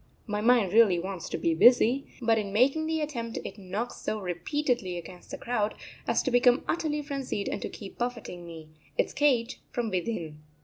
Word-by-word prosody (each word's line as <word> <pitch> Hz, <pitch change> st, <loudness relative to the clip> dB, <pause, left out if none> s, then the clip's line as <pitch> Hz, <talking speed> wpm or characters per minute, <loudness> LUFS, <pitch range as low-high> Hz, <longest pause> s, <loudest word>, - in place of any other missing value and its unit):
My 210 Hz, -2 st, -2 dB
mind 230 Hz, -5 st, +4 dB
really 215 Hz, -5 st, +6 dB
wants 185 Hz, 0 st, -4 dB
to -, -, -2 dB
be 165 Hz, -, +1 dB
busy, 245 Hz, +8 st, +5 dB, 0.2 s
but 225 Hz, -1 st, +4 dB
in 200 Hz, -2 st, -4 dB
making 275 Hz, +9 st, +3 dB
the 320 Hz, 0 st, 0 dB
attempt 235 Hz, -6 st, -4 dB
it -, -, -7 dB
knocks 200 Hz, +5 st, -4 dB
so 215 Hz, -, -2 dB
repeatedly 195 Hz, -, -1 dB
against 175 Hz, +1 st, -10 dB
the -, -, -5 dB
crowd 220 Hz, -3 st, -1 dB, 0.3 s
as -, -, +2 dB
to 260 Hz, -, 0 dB
become 245 Hz, +1 st, +5 dB
utterly 300 Hz, -3 st, -1 dB
frenzied 275 Hz, -8 st, -3 dB
and -, -, -3 dB
to -, -, -3 dB
keep 200 Hz, -3 st, -10 dB
buffeting 235 Hz, -7 st, -4 dB
me, 165 Hz, -2 st, -10 dB, 0.3 s
its -, -, +1 dB
cage, 265 Hz, -4 st, +2 dB
from 235 Hz, -4 st, -2 dB
within. 175 Hz, -5 st, -3 dB
230 Hz, 185 wpm, -28 LUFS, 185-250 Hz, 0.3 s, really